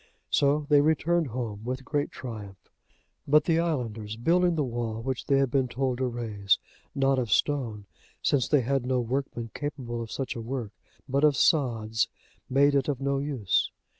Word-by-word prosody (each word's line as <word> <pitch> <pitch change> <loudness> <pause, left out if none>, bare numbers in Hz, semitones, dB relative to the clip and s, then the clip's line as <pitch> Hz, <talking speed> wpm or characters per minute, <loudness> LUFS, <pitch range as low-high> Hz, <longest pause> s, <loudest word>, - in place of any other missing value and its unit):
So 145 +1 +3
they 145 -1 +6
returned 160 +2 +2
home 110 -4 -5
with 130 +2 -4
great 145 0 -1
triumph. 105 -7 -9 0.6
But 150 +2 +5
the 165 0 +2
islanders 115 -10 -2
building 175 +7 +3
the 155 - +1
wall 120 -3 -3
which 130 +1 -4
they 140 - +4
had 135 -2 +2
been 135 -2 +2
told 130 0 -1
to 130 - +1
raise, 110 -5 0 0.4
not 135 -1 +2
of 120 -5 -2
stone, 115 -6 0 0.3
since 135 -5 +1
they 145 -3 +4
had 135 +2 0
no 125 0 +1
workmen 120 -2 -3
capable 130 -5 -4
of 115 - -7
such 135 -3 -3
a 115 - -4
work, 120 -2 -4 0.4
but 140 +2 0
of 150 -3 +5
sods, 115 -8 +2 0.4
made 140 +2 +4
it 140 -2 +2
of 140 -4 -1
no 140 0 0
use. 135 -10 0
130 Hz, 175 wpm, -27 LUFS, 115-145 Hz, 0.6 s, they